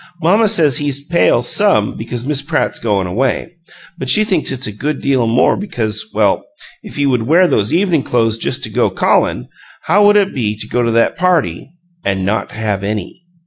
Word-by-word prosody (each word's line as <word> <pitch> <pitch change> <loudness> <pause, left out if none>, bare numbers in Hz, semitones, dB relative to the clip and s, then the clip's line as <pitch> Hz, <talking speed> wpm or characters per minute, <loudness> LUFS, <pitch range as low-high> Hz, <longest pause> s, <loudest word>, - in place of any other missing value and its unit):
Mamma 200 +7 +3
says 160 - +3
he's 140 -1 -3
pale 165 -7 +2
SOME 160 - +1
because 120 +2 -6
Miss 145 -1 -1
Pratt's 155 +2 -2
goin' 100 -4 0
away, 125 - -2 0.5
but 130 - -4
she 215 - +5
thinks 190 -10 0
it's 130 0 -3
a 105 - -2
good 140 +8 -4
deal 130 -4 +1
more 120 +3 +3
because, 110 - -4
well, 105 -2 +1 0.4
if - - -11
he 145 - 0
would 125 -4 0
wear 175 +5 +4
those 105 -9 0
evening 175 -3 +2
clo'es 115 -3 0
just - - -2
to - - -2
go - - +1
CALLIN', - - 0 0.4
how 205 +1 +3
would 205 - +4
it 200 -1 +1
be 110 -5 -2
to 110 - -8
go 125 - -1
to 115 -1 0
that 115 +5 +1
PARTY 170 - 0 0.3
an' 95 -1 -1
not 105 +3 -1
have 105 -2 -3
any! 105 - -5
125 Hz, 195 wpm, -15 LUFS, 110-165 Hz, 0.5 s, she